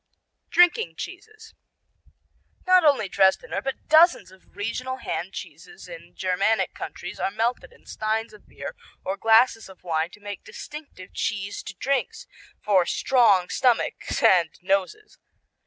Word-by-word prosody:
Drinking 335 - +3
cheeses 435 - -10 1.1
Not 370 -1 +5
only 280 -9 +3
Dresdener, 190 0 +1
but 270 0 -5
dozens 320 - +5
of 190 0 -22
regional 250 +5 -4
hand - - -4
cheeses 435 - -10
in - - -12
Germanic 195 +4 0
countries - - -8
are - - 0
melted 230 - -2
in 475 - -22
steins 220 +1 -3
of 210 - -17
beer 140 +2 -8 0.3
or 190 - -2
glasses 225 0 +3
of 190 - -16
wine 165 -1 -1
to 210 - -16
make 205 -1 -8
distinctive 295 -11 -11
cheesed 200 -2 -4
drinks 275 +2 -2 0.4
for 190 -4 +3
strong 210 -9 +3
stomachs 250 -3 0
and 175 -3 +5
noses. 195 - -2
220 Hz, 130 wpm, -24 LUFS, 190-280 Hz, 1.1 s, Not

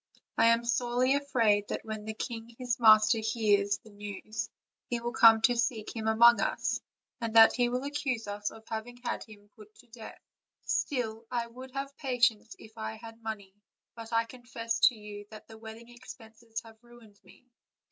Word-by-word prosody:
I 225 - +4
am 230 +1 +3
sorely 245 +2 +1
afraid 230 -8 +2
that - - -5
when 215 -1 -6
the 220 0 -5
king 230 0 -6
his 250 -1 -2
master 215 0 +6
hears 205 -3 +1
the 220 - -18
news 205 +1 -6 0.4
he 240 - -1
will 240 +1 -4
come 225 -1 +7
to 245 - +4
seek 230 -2 -2
him 220 -1 -3
among 235 +2 +6
us, - - -1 0.4
and 230 -2 -4
that 225 0 +9
he 245 -1 +1
will 250 +2 -2
accuse 275 -5 -2
us 205 0 -3
of 225 - -14
having 225 +2 -6
had - - -3
him 205 -2 -16
put 215 -1 -16
to - - -19
death. 225 -1 -11 0.5
Still, 230 -5 -2
I 240 -2 -1
would 255 +3 -11
have 275 0 -5
patience 245 -5 +1
if 220 +1 -15
I 220 0 -4
had 225 0 -12
money; 210 -4 -6 0.4
but 230 -1 -10
I 230 0 +3
confess 230 -1 -5
to 250 - +1
you 210 -1 -10
thab 215 +1 -13
the 220 -1 -14
wedding 225 +1 -11
expenses 225 -2 -10
have 225 -1 -15
ruined 235 -4 -18
me. - - -20
225 Hz, 185 wpm, -30 LUFS, 220-240 Hz, 0.5 s, that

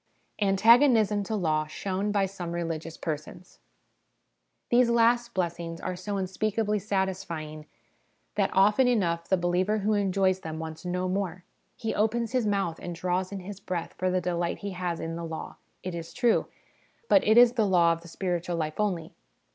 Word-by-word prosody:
Antagonism 215 +1 +5
to 220 - -2
Law 155 -5 0
shown 195 +5 -2
by 200 -1 +2
some 180 -3 -6
Religious 165 -1 -4
Persons. 155 +3 -6 1.1
These 240 0 +5
last 235 0 +3
blessings 170 -2 -2
are 185 0 -4
so 200 +3 -4
unspeakably 210 +3 -1
satisfying, 180 -6 -3 0.7
that - - +1
often 210 +7 +4
enough 170 -8 +1
the 190 - +4
believer 180 +4 +1
who 215 +1 +1
enjoys 195 -2 +2
them 160 -3 -6
wants 160 +1 -7
no 180 +1 -1
more. 185 -2 -2 0.3
He 225 - -3
opens 225 +2 0
his 250 -4 +1
mouth 195 -5 -1
and 175 -1 -6
draws 180 +2 -1
in 195 -1 -5
his 195 +1 -8
breath 180 -3 -4
for 185 - -1
the 185 0 +1
delight 175 -1 -1
he 200 - -2
has 180 -2 -3
in 165 0 -4
the 170 - -5
law, 160 -1 -6 0.3
it 185 - -4
is 170 -1 -7
true; 240 -2 +2 0.6
but 290 - +5
it 220 +2 +4
is 240 0 +8
the 225 -4 +2
law 170 -3 +4
of 165 - -7
the 170 - -13
spiritual 175 0 -2
life 155 0 -3
only. 180 -6 -1
185 Hz, 170 wpm, -27 LUFS, 170-210 Hz, 1.1 s, is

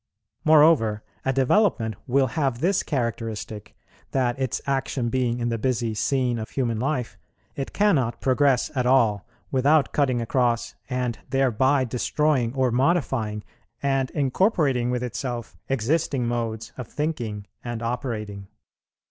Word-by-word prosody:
Moreover 150 -9 +5 0.2
a 135 - +1
development 135 - +2
will 135 +2 +3
have 135 -6 0
this 185 +6 +2
characteristic, 115 -5 -4 0.3
that, 125 -1 0
its 130 -3 -1
action 135 -3 -1
being 125 -1 0
in 120 0 -1
the 115 -1 -2
busy 115 -2 0
scene 125 +1 0
of 110 - -5
human 120 -5 -1
life, 130 -2 -2 0.4
it 135 - -4
cannot 135 - +2
progress 135 -1 +2
at 125 -3 0
all 115 -6 +3 0.2
without 140 +2 +3
cutting 130 -4 +2
across, 120 0 0 0.2
and 125 -2 -2
thereby 135 +1 +2
destroying 125 +1 +1
or 130 -2 +2
modifying 125 -6 0 0.4
and 135 -2 +1
incorporating 140 - +1
with 125 0 -1
itself 120 -1 -4
existing 135 +1 0
modes 115 -2 -3
of 125 - -5
thinking 120 -9 -3 0.2
and 120 -1 -4
operating. 110 -5 -4
125 Hz, 130 wpm, -24 LUFS, 115-135 Hz, 0.4 s, Moreover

